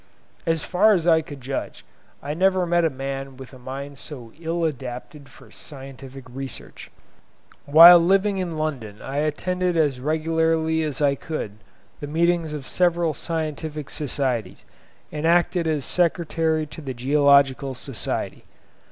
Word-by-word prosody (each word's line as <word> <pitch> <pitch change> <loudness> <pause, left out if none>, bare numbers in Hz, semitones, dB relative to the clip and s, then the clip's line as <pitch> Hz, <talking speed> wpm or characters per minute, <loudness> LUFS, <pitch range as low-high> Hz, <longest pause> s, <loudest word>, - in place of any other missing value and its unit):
As 165 -2 +1
far 210 +4 +4
as 170 -4 0
I 165 -2 +5
could 145 -3 -10
judge, 135 +2 -5 0.4
I 145 +1 -3
never 185 +2 +2
met 175 0 +2
a 165 - +3
man 135 -1 -6
with 130 0 -11
a 130 - -12
mind 135 +2 -7
so 120 -7 -8
ill 170 +1 -2
adapted 135 0 -6
for - - -17
scientific 135 -1 -10
research. 135 +2 -8 0.8
Whilst 165 +4 +10
living 195 +2 +2
in 175 -4 -3
London, 125 -10 -4
I 135 +1 -5
attended 180 +4 -1
as 145 -5 +1
regularly 160 +2 +1
as 150 -2 -2
I 140 -1 +4
could 130 -8 -6 0.4
the 145 - -6
meetings 170 +1 +1
of 150 -3 -6
several 175 -2 +1
scientific 155 -2 -4
societies, 125 - -2 0.5
and 150 +2 -2
acted 175 0 +2
as 150 -4 -1
secretary 165 -2 0
to 155 +2 -10
the 135 -3 -6
Geological 140 0 +3
Society. 130 -1 -3
150 Hz, 145 wpm, -23 LUFS, 135-165 Hz, 0.8 s, Whilst